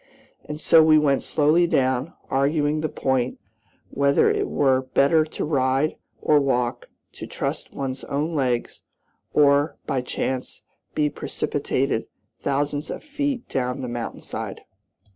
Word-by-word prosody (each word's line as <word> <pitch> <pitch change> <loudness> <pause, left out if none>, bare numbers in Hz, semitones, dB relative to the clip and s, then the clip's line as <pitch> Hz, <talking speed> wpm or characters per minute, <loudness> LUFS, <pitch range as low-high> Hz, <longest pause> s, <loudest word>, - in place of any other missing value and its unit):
And 150 0 -6
so 160 0 +6
we 155 0 +6
went 140 -3 +3
slowly 160 +4 +3
down, 130 0 +1
arguing 145 +2 +1
the 155 - -1
point 130 -2 -1 0.5
whether 140 0 +3
it - - -1
were 130 -2 +2
better 155 +3 +5
to 155 - -4
ride 135 0 +1 0.2
or 150 -1 +4
walk; 125 -3 -1 0.2
to - - -9
trust - - -4
one's 135 -1 -4
own 150 +4 -2
legs, 125 -5 -1 0.5
or, 145 +1 +3
by 135 -2 -1
chance, 130 +1 -4 0.3
be 150 - +2
precipitated - - -2 0.3
thousands 145 +2 -1
of - - -6
feet 285 -4 -3
down 125 -1 -2
the 125 - -4
mountain 120 -1 -5
side. - - -6
140 Hz, 135 wpm, -24 LUFS, 130-155 Hz, 0.5 s, so